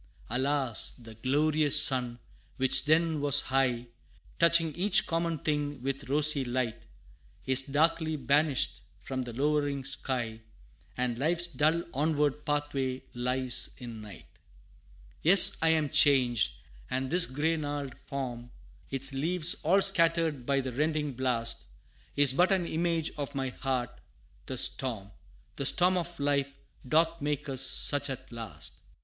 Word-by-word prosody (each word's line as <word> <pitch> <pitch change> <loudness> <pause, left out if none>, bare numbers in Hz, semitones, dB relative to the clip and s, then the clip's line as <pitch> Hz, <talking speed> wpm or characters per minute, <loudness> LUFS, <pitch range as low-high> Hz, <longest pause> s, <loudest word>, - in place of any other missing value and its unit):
Alas! 135 -2 -1
the 115 -2 -13
glorious 145 +5 +2
sun, 125 -3 +3 0.4
which 130 +2 +3
then 160 0 +1
was 145 0 +6
high, 125 -2 -1 0.5
Touching 170 -1 +3
each 195 +4 +2
common 165 -1 -2
thing 145 -1 -3
with 135 0 -5
rosy 150 0 +3
light, 120 -2 -4 0.6
Is 130 0 +2
darkly 160 +3 0
banished 140 - 0 0.2
from 130 +6 -5
the 120 - -7
lowering 145 0 -1
sky 120 -5 -5 0.6
And 125 -1 -2
life's 170 +4 +1
dull 160 +1 0
onward 150 0 -1
pathway 140 -3 -2
lies, 125 +1 -1
in 120 -3 -9
night. 105 -2 -12 1.0
Yes 195 +3 +8
I 165 - +2
am 160 -2 +1
changed 125 - +3 0.4
and 130 0 -3
this 175 0 +4
gray 150 +5 -1
gnarled 145 -3 -5
form, 125 -3 -6 0.4
Its 135 +1 -2
leaves 165 +5 +1
all 190 +5 +3
scattered 165 -8 +3
by 140 -1 +1
the 130 -1 -6
rending 150 +1 -2
blast, 120 -2 -1 0.5
Is 145 -2 +5
but 180 +7 +2
an 185 -3 +1
image 165 -1 -2
of 140 -1 -5
my 135 -1 -2
heart; 125 -2 -4 0.5
the - - -5
storm 110 -7 0 0.5
The 140 - -3
storm 180 +1 +4
of 175 -2 -4
life, 140 -1 -1 0.4
doth 165 +2 +1
make 150 +1 -3
us 135 -2 -1
such 145 +1 +2
at 130 -2 -8
last! 115 -2 -7
140 Hz, 135 wpm, -28 LUFS, 130-160 Hz, 1.0 s, Yes